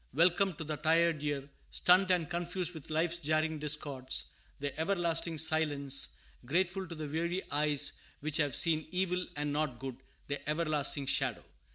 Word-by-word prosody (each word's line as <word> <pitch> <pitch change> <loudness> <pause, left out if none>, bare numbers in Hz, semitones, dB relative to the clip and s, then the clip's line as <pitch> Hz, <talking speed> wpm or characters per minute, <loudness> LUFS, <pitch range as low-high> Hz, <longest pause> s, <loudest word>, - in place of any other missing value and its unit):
Welcome 175 +4 +4
to 160 - -5
the 155 -1 -3
tired 165 0 +3
ear, 145 -2 -2 0.2
stunned 185 +1 +4
and 175 -4 +3
confused 175 +1 -2
with 160 -4 -10
life's 165 +2 +1
jarring 155 0 0
discords, 145 -3 -1 0.3
the 140 -1 -3
everlasting 170 -2 0
silence; 145 -3 +1 0.4
grateful 185 +7 0
to 170 - -7
the 155 -1 -5
weary 170 +5 -1
eyes 145 0 +2 0.3
which 155 +1 0
"have 145 -5 +1
seen 155 -2 +3
evil, 180 0 0
and 145 0 -1
not 150 -4 -1
good," 130 -1 -6 0.3
the 145 +1 -4
everlasting 150 -3 +1
shadow. - - +1
155 Hz, 155 wpm, -32 LUFS, 145-170 Hz, 0.4 s, Welcome